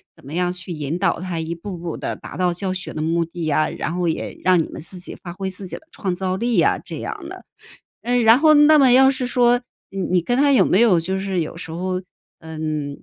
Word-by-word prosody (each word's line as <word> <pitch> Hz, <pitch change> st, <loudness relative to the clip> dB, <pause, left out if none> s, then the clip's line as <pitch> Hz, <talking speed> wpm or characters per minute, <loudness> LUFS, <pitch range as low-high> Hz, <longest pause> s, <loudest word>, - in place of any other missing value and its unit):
怎 -, -, -21 dB
么 140 Hz, +3 st, -10 dB
样 180 Hz, +1 st, 0 dB
去 180 Hz, 0 st, -5 dB
引 155 Hz, +1 st, -3 dB
导 195 Hz, -, +1 dB
他 180 Hz, -2 st, -4 dB
一 160 Hz, +1 st, -4 dB
步 180 Hz, +1 st, -7 dB
步 170 Hz, -1 st, -5 dB
地 -, -, -4 dB
达 -, -, -10 dB
到 180 Hz, -1 st, +1 dB
教 185 Hz, +2 st, -3 dB
学 185 Hz, 0 st, -5 dB
的 155 Hz, -, -4 dB
目 165 Hz, +2 st, +1 dB
的 165 Hz, 0 st, -6 dB
呀， 155 Hz, 0 st, +2 dB
然 170 Hz, -, -4 dB
后 180 Hz, -1 st, 0 dB
也 160 Hz, -, -3 dB
让 185 Hz, -1 st, +4 dB
你 -, -, -5 dB
们 -, -, -8 dB
自 175 Hz, +4 st, -7 dB
己 175 Hz, -, -6 dB
发 175 Hz, -2 st, -7 dB
挥 190 Hz, +1 st, -4 dB
自 190 Hz, +1 st, -7 dB
己 -, -, -5 dB
的 315 Hz, -, -13 dB
创 195 Hz, -, -3 dB
造 185 Hz, +1 st, -2 dB
力 235 Hz, +4 st, 0 dB
呀， -, -, +3 dB
这 -, -, -7 dB
样 -, -, -6 dB
的。 -, -, -10 dB, 0.6 s
呃， 245 Hz, +1 st, 0 dB
然 225 Hz, +2 st, +7 dB
后 310 Hz, +1 st, +6 dB
那 300 Hz, +1 st, +7 dB
么 270 Hz, -3 st, +6 dB
要 265 Hz, +1 st, +7 dB
是 260 Hz, -2 st, -2 dB
说 245 Hz, 0 st, +3 dB, 0.3 s
你 195 Hz, -, -5 dB
你 180 Hz, -1 st, +1 dB
跟 245 Hz, +8 st, 0 dB
他 285 Hz, 0 st, +4 dB
有 265 Hz, -, +5 dB
没 190 Hz, -, +3 dB
有 220 Hz, -7 st, +5 dB
就 190 Hz, +4 st, -2 dB
是 190 Hz, -2 st, -1 dB
有 160 Hz, 0 st, -4 dB
时 165 Hz, -, -8 dB
候， 185 Hz, +2 st, -3 dB, 0.4 s
嗯， 155 Hz, -3 st, -5 dB
185 Hz, 275 characters per minute, -21 LUFS, 165-225 Hz, 0.6 s, 然